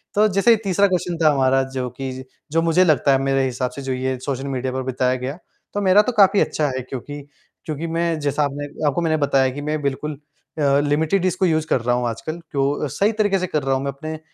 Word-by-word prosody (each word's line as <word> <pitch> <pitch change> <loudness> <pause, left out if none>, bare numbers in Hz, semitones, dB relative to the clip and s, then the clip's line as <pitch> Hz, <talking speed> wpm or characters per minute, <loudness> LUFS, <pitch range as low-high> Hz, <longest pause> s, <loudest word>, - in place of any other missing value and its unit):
तो 215 +1 +5
जैसे 225 +4 +5
तीसरा 200 +1 +3
क्वेश्चन 175 -2 -1
था 155 - +6
हमारा 135 0 +3
जो 125 -1 -2
कि 135 -1 -4
ज 130 0 -7 0.3
जो 165 +1 +2
मुझे 165 +2 +3
लगता 150 -4 +3
है 135 - +5
मेरे 135 0 +1
हिसाब 125 0 -2
से 140 - -8
जो 135 -1 -3
ये 130 0 -2
सोशल 135 0 -4
मीडिया 130 -1 -2
पर 130 0 -2
बिताया 130 0 0
गया। 135 +5 -4 0.4
तो 205 - -1
मेरा 195 +2 +6
तो 250 - -1
काफ़ी 195 +1 +6
अच्छा 150 -1 0
है 130 - -2
क्योंकि, 145 +3 -6 0.4
क्योंकि 155 +1 -4
मैं 165 -1 -1
जैसा 145 0 0
आपने 145 +1 -3 0.2
आपको 160 +5 0
मैंने 160 -1 +1
बताया 135 -2 +2
कि 145 - -6
मैं 150 0 -2
बिल्कुल 140 +2 -2 0.5
अ, 140 -1 +3
लिमिटेड 160 +6 +1
इसको 185 +1 +1
यूज़ 160 -2 +1
कर 125 - +1
रहा 120 +1 +1
हूँ 125 -1 -1
आजकल। 155 +9 -5
क्यों 140 +1 0
सही 205 - +1
तरीके 205 -3 +1
से 185 - -2
कर 150 -4 -1
रहा 135 0 +1
हूँ 135 - -2
मैं 140 - -2
अपने 155 +4 -7
अ, - - -10
145 Hz, 245 wpm, -21 LUFS, 135-170 Hz, 0.5 s, था